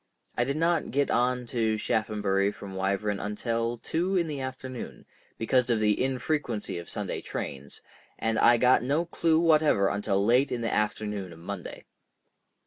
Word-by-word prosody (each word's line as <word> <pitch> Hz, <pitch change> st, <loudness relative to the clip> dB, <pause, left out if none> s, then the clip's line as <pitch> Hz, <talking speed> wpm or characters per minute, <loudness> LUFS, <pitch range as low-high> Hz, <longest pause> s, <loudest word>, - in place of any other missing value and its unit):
I 120 Hz, -, +1 dB
did 140 Hz, +3 st, -2 dB
not 170 Hz, +1 st, +1 dB
get 140 Hz, +1 st, +1 dB
on 125 Hz, +1 st, +1 dB
to 115 Hz, -2 st, 0 dB
Shaphambury 105 Hz, -3 st, 0 dB
from 100 Hz, -2 st, -9 dB
Wyvern 100 Hz, +2 st, -1 dB
until 115 Hz, +3 st, -2 dB
two 175 Hz, +10 st, -1 dB
in 170 Hz, -, +2 dB
the 150 Hz, -3 st, -4 dB
afternoon, 130 Hz, -1 st, -7 dB, 0.3 s
because 125 Hz, +2 st, +2 dB
of 115 Hz, -2 st, +2 dB
the 105 Hz, +2 st, +2 dB
infrequency 130 Hz, -, -2 dB
of 85 Hz, -, -10 dB
Sunday -, -, -4 dB
trains, 70 Hz, +1 st, -6 dB, 0.4 s
and 115 Hz, 0 st, 0 dB
I 120 Hz, 0 st, +6 dB
got 125 Hz, +2 st, +4 dB
no 145 Hz, +7 st, 0 dB
clue 165 Hz, -1 st, +2 dB
whatever 155 Hz, -11 st, +4 dB
until 100 Hz, -1 st, 0 dB
late 125 Hz, +5 st, +3 dB
in 120 Hz, -, -2 dB
the 115 Hz, -, -1 dB
afternoon 105 Hz, -3 st, -2 dB
of 85 Hz, -, -11 dB
Monday. 90 Hz, +2 st, -7 dB
115 Hz, 160 wpm, -28 LUFS, 105-130 Hz, 0.4 s, I